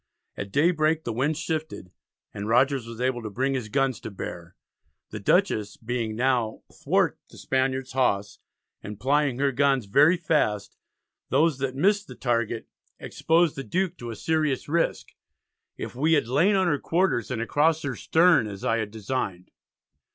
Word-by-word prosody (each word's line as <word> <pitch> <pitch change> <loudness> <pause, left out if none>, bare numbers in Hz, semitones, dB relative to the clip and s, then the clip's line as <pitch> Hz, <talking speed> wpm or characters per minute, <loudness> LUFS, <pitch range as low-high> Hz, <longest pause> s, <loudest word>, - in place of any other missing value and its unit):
At 100 -1 -6
daybreak 160 - +2
the 115 - -3
wind 140 +6 0
shifted, 155 - -4 0.4
and 100 +1 -5
Rogers 125 +1 +2
was 115 0 -9
able 125 -1 0
to 110 - -5
bring 130 +7 -1
his 125 -5 -3
guns 135 +2 0
to - - -7
bear. 90 -3 -8 0.6
The - - -5
Dutchess 105 -1 +1
being 115 -2 -3
now 120 -2 0
"thwart - - 0
the - - -15
Spaniards 130 0 -1
hawse," 105 -6 0 0.4
and 105 0 -8
plying 140 +1 +1
her 140 +1 +1
guns 135 -2 +2
very 145 - +4
fast, 150 - 0 0.5
those 145 +1 +2
that 130 -1 -2
missed 200 +6 +2
their - - -10
target, 115 -2 -1 0.3
exposed 165 -1 +1
the 135 - -5
Duke 185 +3 -1
to 120 - -7
a 115 - -5
serious 155 +1 -1
risk 165 +3 0 0.7
"if - - -6
we 155 +6 +1
had 145 -7 +2
lain 180 - +3
on 190 -1 +2
her 150 -5 +1
quarters 165 - 0
and 125 - -3
across 150 +7 +1
her 135 -4 -3
stem, 165 -6 +3
as 100 +3 -7
I 115 -2 +2
had 110 -2 -2
designed." 105 -4 -4
130 Hz, 165 wpm, -25 LUFS, 115-155 Hz, 0.7 s, very